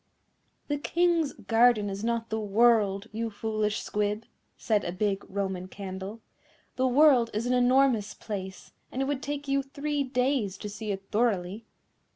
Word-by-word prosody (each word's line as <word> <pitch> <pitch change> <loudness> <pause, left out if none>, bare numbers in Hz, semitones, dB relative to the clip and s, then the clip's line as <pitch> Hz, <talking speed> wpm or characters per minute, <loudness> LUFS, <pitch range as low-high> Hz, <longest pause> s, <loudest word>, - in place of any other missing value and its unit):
"The 290 -1 -1
King's 335 -1 +1
garden 225 -2 +3
is 200 +1 -5
not 230 -1 -1
the 220 - 0
world, 210 -1 +3
you 225 +1 -3
foolish 215 0 -2
Squib," 210 +2 -1 0.3
said 210 -3 +1
a - - -3
big 195 +2 -1
Roman 190 -2 -3
Candle; 195 +3 -7 0.5
"the 260 0 +2
world 255 -3 +5
is 220 +3 -1
an 250 - +1
enormous 250 -3 +3
place, 190 -3 -7 0.2
and 265 - -1
it - - -1
would 280 -1 -2
take 290 0 -4
you 275 0 +2
three 285 +2 -3
days 250 -6 0
to 210 - -6
see 215 +1 -6
it 195 0 -4
thoroughly." 215 -2 0
225 Hz, 160 wpm, -28 LUFS, 205-260 Hz, 0.5 s, world